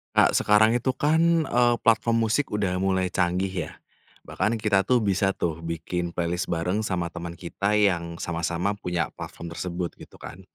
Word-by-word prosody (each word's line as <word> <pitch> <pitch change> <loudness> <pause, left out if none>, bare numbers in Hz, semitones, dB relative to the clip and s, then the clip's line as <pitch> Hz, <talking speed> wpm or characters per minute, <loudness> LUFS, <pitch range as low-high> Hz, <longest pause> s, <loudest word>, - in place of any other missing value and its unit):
Kak, - - +5
sekarang 110 +2 +4
itu 120 +2 0
kan, 160 +5 +2
eee, 120 -2 +3
platform 115 +1 +3
musik 125 +6 0
udah 95 -3 -1
mulai 95 -1 0
canggih, 90 -2 -1
ya. - - -13 0.5
Bahkan 110 +2 -1
kita 100 -1 +3
tuh 125 +2 +3
bisa 95 -1 +1
tuh 85 -1 -2
bikin 85 +1 -4
playlist 85 0 -2
bareng 90 +5 -1
sama 90 -4 -2
teman 85 -1 -6
kita 100 +4 -2
yang 85 -5 +1
sama-sama 85 +4 -2
punya 90 -5 -2
platform 85 0 -8
tersebut, 90 -1 -4
gitu - - -14
kan. 90 - -10
95 Hz, 165 wpm, -25 LUFS, 85-110 Hz, 0.5 s, Kak